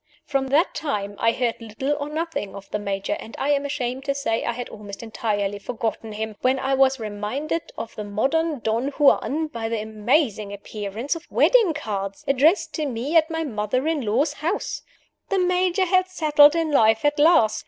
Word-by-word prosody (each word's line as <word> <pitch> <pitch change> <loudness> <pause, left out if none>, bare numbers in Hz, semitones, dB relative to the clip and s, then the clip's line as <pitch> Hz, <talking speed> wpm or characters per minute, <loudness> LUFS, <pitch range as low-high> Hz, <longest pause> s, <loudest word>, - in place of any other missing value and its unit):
From 275 -2 -1
that 295 +7 +2
time 205 -9 -3
I 230 - +3
heard 240 -1 -2
little 230 +6 -2
or 290 0 -4
nothing 315 - -3
of 200 0 -10
the 210 - -1
Major; 200 -1 -2
and 225 - -10
I 275 - -1
am 285 0 +1
ashamed 265 -2 -3
to 275 - 0
say 230 -5 -1
I - - 0
had 245 +1 -5
almost 205 0 -9
entirely 205 -3 -2
forgotten 225 0 -4
him 215 0 -5
when 260 +1 +2
I 265 +1 -1
was 270 0 +3
reminded 220 +10 -3
of 225 0 -6
the 210 - -6
modern 275 +8 0
Don 225 +4 0
Juan 295 +1 +3
by 230 -7 -5
the 230 -1 -1
amazing 215 0 0
appearance 205 +5 -4
of 330 +1 -9
wedding 440 -11 +4
cards, 200 -8 -4
addressed 285 +8 +3
to 310 -3 -2
me 260 +5 -3
at 320 0 +5
my 325 0 -2
mother 250 +1 -1
in 320 -3 0
law's 260 +7 +1
house! 335 +7 -3 0.5
The 395 - +1
Major 365 +1 +2
had 370 +1 +2
settled 300 -4 +5
in 325 -2 0
life 225 -2 +4
at 290 +1 +2
last. 290 -9 +5
265 Hz, 190 wpm, -23 LUFS, 215-305 Hz, 0.5 s, at